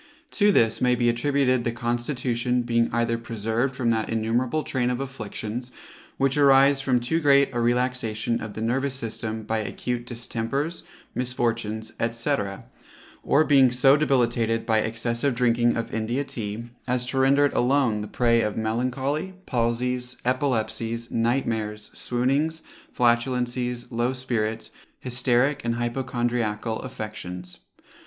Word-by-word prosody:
To 205 -1 +4
this 115 - +2
may 125 0 +4
be 120 -1 +2
attributed 130 +1 +1
the 120 - 0
constitution 120 +1 -1
being 115 0 +1
either 115 0 0
preserved 115 +3 -2
from 120 -2 +1
that 110 -1 -1
innumerable 120 +7 0
train 125 -2 -1
of 125 0 -1
afflictions, 120 -2 -5 0.5
which 135 +1 +1
arise 140 0 +6
from 130 -2 +2
too 125 +7 0
great 140 -3 +4
a 120 - -1
relaxation 120 -2 0
of 110 -1 -7
the 110 - -3
nervous 135 +4 0
system 110 -2 -4
by 110 +1 -1
acute 120 +2 -4
distempers, 125 +6 -3 0.3
misfortunes, 115 -3 -2 0.2
&c. 120 +5 0 0.9
or 150 - +3
being 135 -4 +5
so 135 +2 +5
debilitated 120 -6 +1
by 110 -1 +3
excessive 115 +4 -1
drinking 120 -1 +2
of 115 - -4
India 115 +5 -1
Tea, 110 -4 -5 0.2
as 125 0 +1
to 130 +1 -2
render 140 +2 +5
it 145 - 0
alone 125 -4 +2
the 105 - -5
prey 115 0 +2
of 105 -2 -2
melancholy, 130 +10 -1
palsies, 125 +1 -1
epilepsies, 115 -3 -1
night 120 +4 +1
mares, 105 -2 -3
swoonings, 140 +6 0 0.3
flatulencies, 125 0 0
low 120 +2 0
spirits, 115 -4 -2 0.3
hysteric 125 +2 +1
and 115 0 0
hypochondriacal 120 -3 -1
affections. 105 -7 -7
120 Hz, 135 wpm, -25 LUFS, 115-130 Hz, 0.9 s, arise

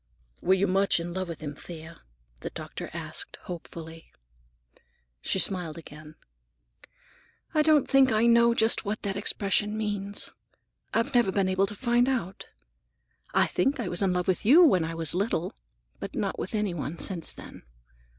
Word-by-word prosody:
"Were 190 - +4
you 190 +1 +1
much 195 -1 +2
in 170 +1 -5
love 185 0 -3
with 165 -1 -7
him, 145 -2 -5
Thea?" 160 +2 -11 0.4
the - - -5
doctor - - -7
asked - - -4
hopefully. 165 -2 -9 1.1
She - - 0
smiled 180 -5 +1
again. 155 -1 -12 1.4
"I 310 - +4
don't 305 -2 +4
think 270 -2 +5
I 220 +1 +3
know 235 0 +5
just 225 0 +3
what 215 +1 -4
that 200 -2 -2
expression 205 +1 +1
means. 205 -2 -2 0.6
I've 230 +5 0
never 240 -6 +3
been 195 -1 +1
able 190 +1 +2
to 210 - -4
find 240 +2 +2
out. 210 -8 -3 0.9
I - - +5
think 275 +1 0
I 215 -7 -2
was 175 - -1
in 195 -2 +2
love 180 0 -1
with 185 -2 0
you 310 - +7
when 185 - +4
I 165 +1 -4
was 165 -2 0
little, 190 -1 -1 0.5
but - - -7
not - - -2
with 235 - -4
any 210 -4 0
one 160 0 -5
since 170 -3 +1
then. - - -12
195 Hz, 170 wpm, -27 LUFS, 170-230 Hz, 1.4 s, you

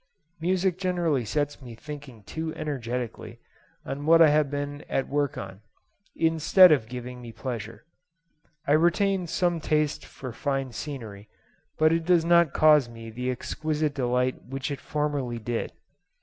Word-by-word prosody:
Music 185 +1 0
generally 175 -8 0
sets 145 +5 -2
me 120 -3 -10
thinking 140 -4 -10
too 160 +8 -4
energetically 125 -6 -4 0.5
on 145 +2 -5
what 165 +1 +7
I 165 -2 +8
have 150 -1 +3
been 145 0 -4
at 135 - 0
work 145 -1 -1
on, 95 +1 -8 0.5
instead 165 +3 +6
of 130 -7 +2
giving 125 0 -7
me 120 -1 -9
pleasure. 115 -2 -6 0.8
I - - 0
retain 175 +4 +3
some 175 0 0
taste 150 -1 0
for 130 -3 -9
fine 135 0 -2
scenery, 110 -7 -7 0.5
but 155 +1 +4
it 165 0 0
does 170 -1 +3
not 170 -3 +5
cause 150 -5 +5
me 115 -1 -10
the 125 +3 -3
exquisite 150 +4 -2
delight 125 -1 0
which 135 +3 -4
it 140 - -5
formerly 145 -5 -2
did. 115 +1 -3
145 Hz, 150 wpm, -26 LUFS, 125-160 Hz, 0.8 s, I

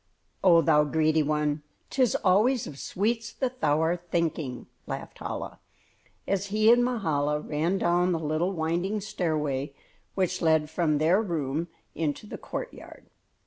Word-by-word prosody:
"Oh, 170 -3 +7
thou 150 0 +5
greedy 155 +1 +2
one! 150 0 0 0.3
'Tis 255 -4 +2
always 215 +6 +3
of 140 - -9
sweets 225 +3 -1
that 255 -1 -3
thou 150 0 +3
art 175 +2 -1
thinking," 160 -6 -2 0.2
laughed - - -6
Chola, - - -5 0.7
as 195 0 0
he 215 +2 +4
and 240 0 +5
Mahala 155 - 0
ran 160 +5 -1
down 175 0 +2
the 170 - +1
little 160 +3 -1
winding 175 +4 -1
stairway 150 -8 -2 0.4
which 185 -1 0
led 160 -2 +2
from 160 -2 +1
their 165 +7 +3
room 160 -5 -2 0.3
into 160 +4 -2
the - - -8
courtyard. - - -8
170 Hz, 145 wpm, -27 LUFS, 150-195 Hz, 0.7 s, Oh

